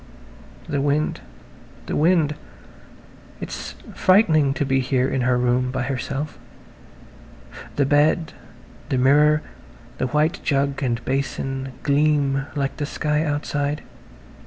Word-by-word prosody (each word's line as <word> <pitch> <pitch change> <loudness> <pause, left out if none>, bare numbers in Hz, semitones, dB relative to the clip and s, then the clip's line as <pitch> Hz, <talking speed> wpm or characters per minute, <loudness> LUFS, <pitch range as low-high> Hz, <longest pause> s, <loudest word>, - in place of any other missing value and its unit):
The 145 -3 -1
wind, 145 +2 0 0.6
the - - -3
wind. 160 -1 +3 1.1
It's - - -6 0.2
frightening 160 -8 +4
to 145 - 0
be 135 0 +2
here 130 0 +1
in 135 - -1
her 125 0 +2
room 125 +1 +1
by 130 0 -2
herself. 135 +3 -4 1.4
The 140 - +2
bed, 150 +3 +2 0.6
the 130 - +1
mirror, 150 +4 +4 0.6
the 130 - +1
white 150 +5 +1
jug 140 0 0
and 120 -3 -1
basin 135 0 -2
gleam 140 -2 +2
like 140 -2 -2
the 145 - -2
sky 150 0 0
outside. 145 -1 -2
140 Hz, 115 wpm, -22 LUFS, 135-150 Hz, 1.4 s, frightening